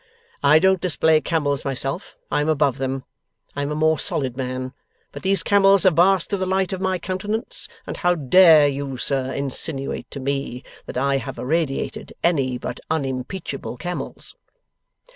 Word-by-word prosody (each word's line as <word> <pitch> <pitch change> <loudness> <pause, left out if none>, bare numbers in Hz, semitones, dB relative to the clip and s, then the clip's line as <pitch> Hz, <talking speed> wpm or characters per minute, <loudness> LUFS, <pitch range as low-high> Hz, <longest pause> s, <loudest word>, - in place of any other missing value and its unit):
'I 145 +2 +6
don't 190 +1 +3
display 160 -3 +3
camels 145 -5 -1
myself, 135 +6 -3
I 150 - +2
am 150 - 0
above 140 -5 +1
them: 135 0 -2 0.5
I 145 - -2
am 140 - -2
a - - -2
more 155 0 +2
solid 130 -3 0
man; 130 0 -4 0.4
but - - -9
these 195 +1 +1
camels 200 -1 +5
have 185 -3 +5
basked 180 +3 +3
in 200 - +1
the 185 - -1
light 190 0 0
of 190 - -4
my 190 -1 0
countenance, 200 +6 -4 0.2
and - - -6
how 175 -1 +2
dare 160 0 +6
you, 140 -1 -3
sir, 130 0 -1
insinuate 140 0 -3
to 140 - -7
me 135 -2 -3 0.2
that - - -6
I 135 +1 +2
have 135 0 -6
irradiated 145 0 -2
any 135 -7 +1
but 125 0 -6
unimpeachable 135 -1 -3
camels? 175 +5 -6
150 Hz, 165 wpm, -22 LUFS, 135-180 Hz, 0.5 s, I